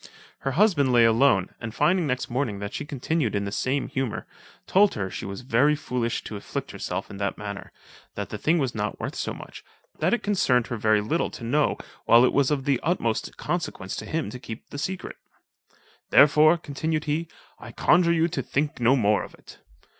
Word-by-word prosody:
Her 135 - -2
husband 165 -7 +3
lay 120 -2 +6
alone, 115 -4 +4
and 115 +1 -6
finding 165 +4 +2
next 125 -1 -1
morning 120 -4 -2
that 100 +1 -6
she - - -4
continued 140 -3 -1
in 100 0 -1
the 100 - -4
same 130 +6 -1
humour, 130 -4 -3 0.4
told 200 +1 +4
her, 95 -2 -3
she - - -5
was 100 +2 -6
very 130 +4 +3
foolish 125 -5 -2
to 110 - -7
afflict 100 - -5
herself - - -5
in - - -8
that 100 0 -2
manner; 100 -1 -7 0.4
that - - -4
the - - -6
thing 165 +3 +2
was 135 -6 -1
not 105 -1 -3
worth - - -4
so - - -3
much; - - -10 0.4
that 165 +4 +2
it 240 - 0
concerned 130 - +2
her 120 - -4
very 110 -1 +3
little 155 +11 0
to - - -10
know 145 +6 +1 0.3
while 120 +2 +7
it - - +1
was 140 -2 +3
of 140 -3 -1
the 140 -3 +2
utmost 130 -10 -1
consequence 170 -3 -3
to - - -5
him 155 -10 -2
to 125 - -8
keep 115 -2 -9
the 145 - -6
secret: 185 +4 -4 0.9
"therefore," 150 +3 +6
continued 155 +1 -3
he, 155 +3 -1 0.3
"I - - -10
conjure 175 -1 +3
you 165 0 +3
to 140 - -2
think 145 +3 -2
no 120 +3 +4
more 105 -4 +2
of - - -9
it." - - -16
135 Hz, 205 wpm, -25 LUFS, 115-155 Hz, 0.9 s, while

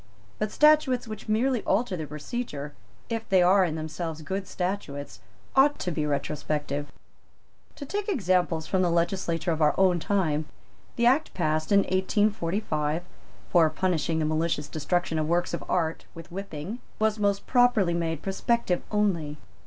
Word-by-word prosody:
But 215 - 0
statutes 300 -5 +4
which 215 0 -8
merely 240 +2 +2
alter 200 -1 0
the 155 -3 -5
procedure, 150 - -5 0.3
if 225 -1 -4
they 185 -2 +5
are 190 +2 +5
in 165 -4 -1
themselves 160 0 -5
good 190 +5 -3
statutes, 150 - -4 0.4
ought 290 +2 +5
to 180 - -3
be 150 -2 -1
retrospective. 145 0 -2 0.8
To 285 - -7
take 410 +7 -3
examples 180 - +1
from 190 +2 +1
the 180 - +2
legislation 170 0 0
of 160 - -4
our 150 - +4
own 185 -2 +4
time, 160 -5 0 0.5
the 235 - +1
Act 270 +6 +3
passed 155 -2 0
in 200 0 +6
1845, 185 -5 0 0.5
for 165 -3 +5
punishing 165 -2 0
the 155 - 0
malicious 155 -1 0
destruction 160 +1 -1
of 155 - -1
works 175 +1 +1
of - - -3
art 165 -2 0
with 165 +1 -11
whipping, 195 +2 -6 0.2
was 215 0 +1
most 200 -1 +1
properly 245 -8 +3
made 165 -2 -2
prospective 195 -1 0
only. 175 -8 0
180 Hz, 155 wpm, -27 LUFS, 155-210 Hz, 0.8 s, in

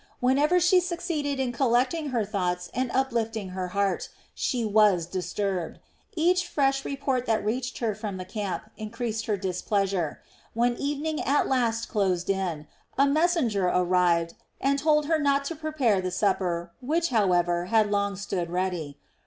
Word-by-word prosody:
Whenever 285 +8 +3
she 360 +1 +5
succeeded 335 -6 -2
in 260 -2 0
collecting 255 +5 +1
her 235 -5 0
thoughts 180 -3 -2
and 255 +2 -1
uplifting 225 -6 -1
her 185 0 -4
heart, 200 +1 -1 0.2
she 240 -3 -1
was 210 -5 +4
disturbed. 180 0 -3 0.4
Each 360 +2 +2
fresh 275 -1 +1
report 270 -2 -2
that 225 -2 +1
reached 245 +4 -2
her 225 -3 -1
from 205 -2 -5
the 185 - -6
camp 200 0 -4
increased 225 0 -4
her 210 -2 +1
displeasure. 190 -2 -1 0.4
When 240 +1 +2
evening 295 +2 -2
at 285 +2 +2
last 230 -3 0
closed 190 -4 0
in, 180 -6 -2 0.3
a 275 - +5
messenger 280 - +2
arrived 175 -2 +2 0.3
and 275 +1 +1
told 300 0 +3
her 320 +1 +2
not 280 -1 +2
to 330 - -3
prepare 290 -10 +1
the 185 - -2
supper 180 -3 0
which, 330 +6 0
however, 175 -6 +2
had 215 +1 +2
long 200 -1 0
stood 185 -3 -3
ready. 175 -5 -2
220 Hz, 155 wpm, -26 LUFS, 185-275 Hz, 0.4 s, she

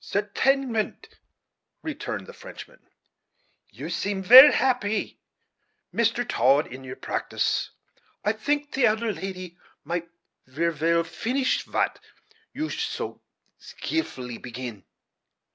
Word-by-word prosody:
"Certainement," 225 +3 0 0.7
returned - - -5
the - - -11
Frenchman; - - -12 0.9
"you 130 +10 -8
seem 195 +2 -2
ver 255 +8 +11
happy, 245 -5 0 0.7
Mister 235 +1 +1
Todd, 140 - +3
in 130 +2 -10
your 130 -1 -7
pratice. - - -1 0.6
I 210 - +3
tink 290 +6 -1
the 260 -3 +3
elder 220 0 0
lady 185 -1 -7 0.2
might 170 0 -3 0.4
ver 165 +6 0
well 165 +2 +1
finish 255 +9 -1
vat - - -1 0.5
you 310 +2 -4
so - - -4 0.4
skeelfully 125 - -4
begin." 120 -5 -7
200 Hz, 105 wpm, -25 LUFS, 155-245 Hz, 0.9 s, ver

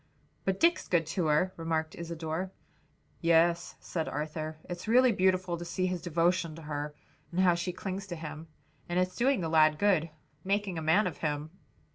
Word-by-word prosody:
"But 190 0 0
Dick's 340 +1 +3
good 170 -2 +2
to 180 -5 0
her," 155 +5 +2
remarked 160 -1 -1
Isadore. 170 +1 -4 0.7
"Yes," 170 +1 +3
said 160 -3 -3
Arthur, 155 +1 -4
"it's 175 +3 -7
really 250 +2 +6
beautiful 185 -3 +1
to 170 - -6
see 185 +2 -1
his 180 -2 -1
devotion 170 -1 +1
to 165 - -10
her 150 0 -4 0.4
and 180 +2 +1
how 180 -2 +5
she 170 +1 -2
clings 190 +2 -5
to 175 - -5
him. 155 0 -7 0.4
And 175 - -1
it's 185 0 0
doing 260 -2 +2
the 165 - -1
lad 155 -1 +5
good; 180 -4 +2 0.3
making 195 -3 0
a - - -5
man 160 +7 +4
of 175 -5 -3
him." 150 0 -2
170 Hz, 180 wpm, -30 LUFS, 160-185 Hz, 0.7 s, really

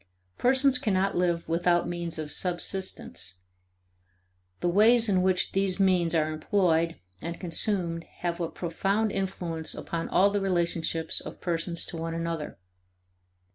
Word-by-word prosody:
Persons 260 +1 +4
cannot 195 -5 +1
live 175 -1 0
without 175 +1 +2
means 170 -1 -4
of 155 -1 -5
subsistence; 180 - -3 1.2
the - - -1
ways 225 +6 +5
in 190 -3 +3
which 185 -1 +1
these 195 -1 +1
means 180 -3 +3
are 155 -1 +2
employed 165 0 +1 0.3
and 170 +1 -5
consumed 170 -1 0 0.2
have 175 -1 -2
a 165 - -1
profound 195 +5 -1
influence 175 -5 -3
upon 165 -1 -4
all 200 +2 +4
the 205 0 0
relationships 170 -3 +1
of - - -9
persons 170 -1 0
to 170 - -7
one 165 0 -3
another. 165 -2 -4
175 Hz, 135 wpm, -27 LUFS, 165-195 Hz, 1.2 s, ways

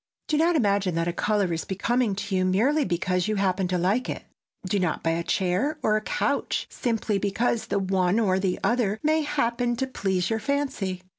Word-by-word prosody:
Do 305 - +1
not 330 +3 +3
imagine 200 - +1
that 165 0 0
a 175 - -1
color 200 -2 0
is 165 - -2
becoming 225 +2 0
to 200 0 -3
you 185 - +2
merely 245 +11 +2
because 180 0 0
you 215 - 0
happen 190 -1 +1
to 180 0 0
like 195 +8 0
it. - - -4 0.4
Do 200 +2 +1
not 180 -4 -1
buy 165 - +2
a 165 +1 0
chair 190 - 0
or 215 - +3
a 215 - +1
couch - - -1
simply 225 -4 -1
because 220 +3 0
the 200 - 0
one 190 +1 +1
or 190 -4 +2
the 190 -2 -1
other 225 -4 +1
may 310 +1 +3
happen 245 -5 0
to 265 +3 -1
please 190 -8 -1
your 225 - 0
fancy. 240 -9 -2
200 Hz, 205 wpm, -25 LUFS, 185-240 Hz, 0.4 s, not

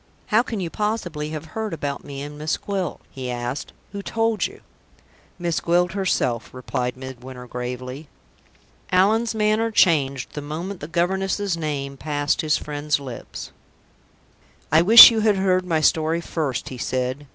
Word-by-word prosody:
"How 220 - +6
can 230 -3 -4
you 170 -3 -3
possibly 175 -8 -2
have 155 0 -6
heard 220 -3 -3
about 145 -3 -4
me 140 -1 -7
and 145 0 -8
Miss 155 +1 -2
Gwilt?" 195 -4 -4
he 130 -2 -6
asked. 120 +3 -4 0.2
"Who 200 0 -5
told 225 +1 0
you?" - - -15 0.8
"Miss 170 -2 -1
Gwilt 175 +1 +2
herself," 170 - -1
replied 125 0 -3
Midwinter, 130 -1 -9
gravely. 125 +4 -6 0.8
Allan's 220 +5 +3
manner 215 +1 +2
changed 140 - +2
the 150 - -5
moment 170 +6 -5
the 145 - -7
governess's 190 +3 0
name 140 -4 -4
passed 145 0 -1
his 155 -1 +2
friend's 150 0 -2
lips. 130 -4 -8 1.2
"I 155 +2 +6
wish 225 +7 +11
you 225 - 0
had 215 -1 +3
heard 185 -1 +1
my 160 -3 +1
story 160 +1 +2
first," 155 -7 -3
he 130 - -8
said. 130 +3 -2
155 Hz, 150 wpm, -23 LUFS, 140-190 Hz, 1.2 s, wish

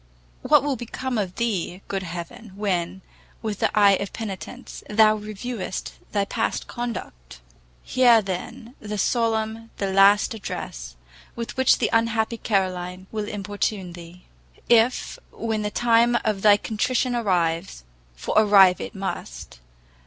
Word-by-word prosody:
what - - +4
will 285 -2 0
become 245 +1 -4
of 185 -3 -3
thee, 195 -5 -2
good 195 -1 -2
Heaven, 175 +4 -8
when, 190 -2 -2 0.4
with 215 -2 -3
the - - +2
eye 205 -1 +7
of 200 - -5
penitence, 220 +3 -7
thou 215 0 +5
reviewest 210 -1 -5 0.2
thy 200 -2 +1
past 225 +2 -2
conduct! 185 - -7 0.4
Hear, 245 -3 +5
then, 220 +5 -6
the 210 -1 -5
solemn, 225 0 0
the 195 -1 -2
last 200 +3 +5
address, - - -6 0.4
with 235 -1 -5
which 260 0 +4
the 225 - 0
unhappy 230 0 +1
Caoline 185 -4 -2
will 215 -1 -3
importune 205 -2 -3
thee. 175 +1 -12 0.4
If 235 +1 +2
when 220 -2 -2
the 210 - -1
time 235 +2 +3
of 210 -3 0
thy 205 0 +6
contrition 245 +4 -1
arrives, 175 - -1 0.3
for - - -4
arrive 200 -4 +6
it - - -7
must! 190 - -6
210 Hz, 135 wpm, -24 LUFS, 190-230 Hz, 0.4 s, eye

